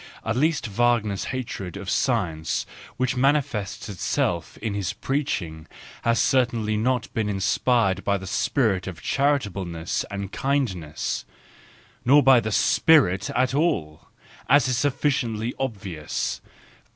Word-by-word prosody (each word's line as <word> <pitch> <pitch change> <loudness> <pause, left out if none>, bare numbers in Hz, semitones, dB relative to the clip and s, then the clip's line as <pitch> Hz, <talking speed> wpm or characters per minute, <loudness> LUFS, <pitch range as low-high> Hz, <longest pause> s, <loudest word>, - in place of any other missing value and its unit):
At 110 - 0
least 155 +3 +1
Wagner's 110 -2 +1
hatred 115 -8 -5
of 100 - -8
science, 85 - 0 0.3
which 130 0 0
mani¬ 135 +4 +4
fests 105 -8 -5
itself 90 -3 -2
in 110 -2 -3
his 100 0 -2
preaching, 105 - -3 0.3
has 115 0 +2
certainly 120 -4 +2
not 120 +2 0
been 110 -2 -1
inspired 100 0 +1
by 100 0 +1
the 95 - -8
spirit 95 -2 0
of 95 -4 -7
charitableness 100 - -1
and 100 -1 -5
kindness—nor 130 - -1
by 135 -2 +7
the 110 -1 -3
spirit 105 - +4
at 130 +1 +2
all, 85 - -1 0.4
as 145 -2 +5
is 130 - +1
sufficiently 125 -4 0
obvious. 100 - -3
110 Hz, 120 wpm, -24 LUFS, 95-130 Hz, 0.4 s, by